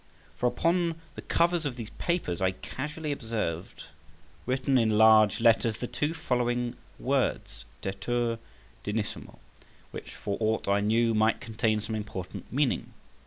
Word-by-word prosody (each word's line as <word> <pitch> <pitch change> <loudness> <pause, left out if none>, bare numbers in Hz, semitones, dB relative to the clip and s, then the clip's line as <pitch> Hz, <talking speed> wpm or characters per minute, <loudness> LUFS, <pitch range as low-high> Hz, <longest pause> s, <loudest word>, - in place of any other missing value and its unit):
For 125 - +1
upon 170 +6 +1 0.2
the - - -7
covers 170 0 +2
of 140 -5 -2
these 115 -3 -7
papers 170 - -1
I 95 0 +2
casually 150 - -5
observed 110 - -3 0.6
written 130 +1 +2
in 110 -2 +2
large 110 -1 +6
letters 115 -1 +4
the - - -3
two 150 +6 -2
following 120 -4 0 0.2
words, - - -1 0.2
DETUR 115 +4 -1 0.4
DIGNISSIMO, 105 0 -4 0.5
which, - - -8
for 100 - -3
aught 110 0 0
I 100 0 +3
knew, 115 +3 +2
might 110 +1 +3
contain 110 -1 0
some 110 +2 -5
important 100 -4 -6
meaning. 140 0 0
115 Hz, 135 wpm, -28 LUFS, 105-130 Hz, 0.6 s, large